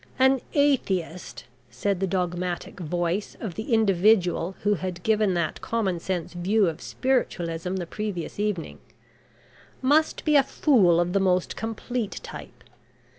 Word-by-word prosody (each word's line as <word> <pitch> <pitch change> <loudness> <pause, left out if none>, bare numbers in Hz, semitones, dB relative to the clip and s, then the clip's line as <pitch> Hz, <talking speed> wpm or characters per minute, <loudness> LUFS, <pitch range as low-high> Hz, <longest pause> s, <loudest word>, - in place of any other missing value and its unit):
"An 265 0 +4
atheist," 185 - 0 0.2
said 180 +11 -1
the 195 - 0
dogmatic 180 0 -2
voice 175 +3 -2
of 210 -7 -5
the 220 +7 -6
individual 195 -4 +3
who 210 0 +3
had 180 -1 -4
given 215 -4 +2
that 170 -2 -2
common 200 -7 -1
sense 175 -1 -3
view 195 +4 +2
of 165 -1 -3
spiritualism 180 -9 -1
the 180 -2 -3
previous 200 -1 -5
evening, 205 -6 -2 1.0
"must 295 +4 +2
be 305 -1 +3
a 285 - +8
fool 205 - +3
of 175 +1 0
the 200 - +3
most 185 -2 +1
complete 225 0 -4
type. - - -10
190 Hz, 135 wpm, -25 LUFS, 175-220 Hz, 1.0 s, a